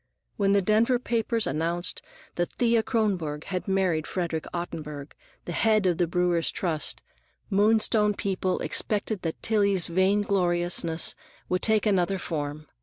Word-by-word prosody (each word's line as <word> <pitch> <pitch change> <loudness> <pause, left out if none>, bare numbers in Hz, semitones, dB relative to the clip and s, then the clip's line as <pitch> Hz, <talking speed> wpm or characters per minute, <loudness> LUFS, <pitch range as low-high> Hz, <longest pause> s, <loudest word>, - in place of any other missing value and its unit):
When 200 -1 +2
the 200 -1 +3
Denver 225 +5 +3
papers 230 -1 -1
announced 165 +5 0 0.3
that 175 0 -2
Thea 235 -2 +2
Kronborg 185 - -1
had 185 0 -4
married 185 -5 +1
Frederick 170 -3 -3
Ottenburg, 150 -4 -6 0.3
the - - -5
head 215 +3 +2
of 180 -2 +1
the 175 - +2
Brewers' 175 -1 +1
Trust, 160 -5 -2 0.5
Moonstone 210 +1 +3
people 190 -2 -1
expected 210 -1 -1
that 165 -1 -4
Tillie's 200 -5 +2
vain 190 +4 +2
gloriousness 175 -3 +1 0.4
would 180 0 0
take 220 -1 +2
another 195 -2 +2
form. 155 -3 -4
185 Hz, 135 wpm, -26 LUFS, 170-210 Hz, 0.5 s, the